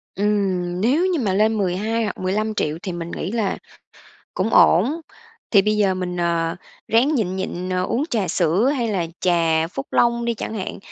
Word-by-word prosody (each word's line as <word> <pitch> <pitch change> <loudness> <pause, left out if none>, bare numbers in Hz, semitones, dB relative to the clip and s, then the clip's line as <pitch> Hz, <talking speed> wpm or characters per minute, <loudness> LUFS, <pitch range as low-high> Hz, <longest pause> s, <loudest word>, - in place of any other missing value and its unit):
Ừm, 190 -3 0
nếu 275 - +2
như 365 -4 +1
mà 205 -7 0
lên 215 +3 +2
12 210 +4 0
hoặc 205 - -3
15.000.000 190 -4 -1
thì 185 - -3
mình 170 -1 -6
nghĩ 190 - -4
là 220 -4 -1 0.8
cũng 190 +4 0
ổn, 240 - +4 0.5
thì 200 -3 +6
bây 215 +1 +1
giờ 200 -3 +2
mình, 180 -1 -4
ờ, 170 -1 0 0.3
ráng 250 +7 +3
nhịn 190 -8 -1
nhịn, 185 -1 -4
ờ, 185 0 0
uống 240 +9 0
trà 210 -6 0
sữa 180 +8 +2
hay 235 -3 -1
là 185 -6 -1
trà 165 -3 +2
Phúc 135 -6 -6
Long 235 0 +2
đi 235 0 0
chẳng 220 - -5
hạn, 195 -4 -5
195 Hz, 185 wpm, -21 LUFS, 180-225 Hz, 0.8 s, thì